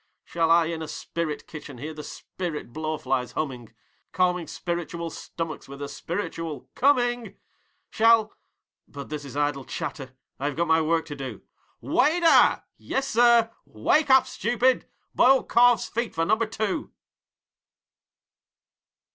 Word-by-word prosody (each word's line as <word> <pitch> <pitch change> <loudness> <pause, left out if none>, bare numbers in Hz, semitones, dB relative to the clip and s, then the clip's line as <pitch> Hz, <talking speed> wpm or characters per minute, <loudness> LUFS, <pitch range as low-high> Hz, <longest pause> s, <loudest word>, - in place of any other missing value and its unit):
Shall 165 -1 0
I 165 0 +5
in 160 0 -4
a 160 - -5
spirit 155 -2 -4
kitchen 150 -4 -10
hear 150 +5 -6
the 155 - -8
spirit 160 -9 -6
blowflies 135 -5 -2
humming, 125 -7 -4 0.4
Calming 180 -2 +1
spiritual 170 -1 -4
stomachs 165 -2 -6
with 140 0 -9
a 145 - -4
spiritual 165 -2 -5
'Coming!'? 245 -3 +1 0.6
Shall 225 -1 +4 0.5
but 140 -2 -9
this 150 -1 -5
is 140 0 -8
idle 145 -2 0
chatter, 135 -4 -6 0.2
I 140 - -3
have 145 - -3
got 170 - +1
my 160 0 +4
work 160 +1 +1
to 150 -2 -7
do. 130 -6 -7 0.4
'WAITER!!' 305 - +4 0.2
'Yessir.' 235 -3 +3
'Wake 285 - +1
up, 265 0 +6
stupid! 245 +3 +1 0.3
Boiled 265 +1 +4
calves' 240 -3 +4
feet 235 +1 -3
for 165 0 +1
Number 220 +4 +2
Two!' 215 -2 -3
165 Hz, 130 wpm, -25 LUFS, 145-230 Hz, 0.6 s, up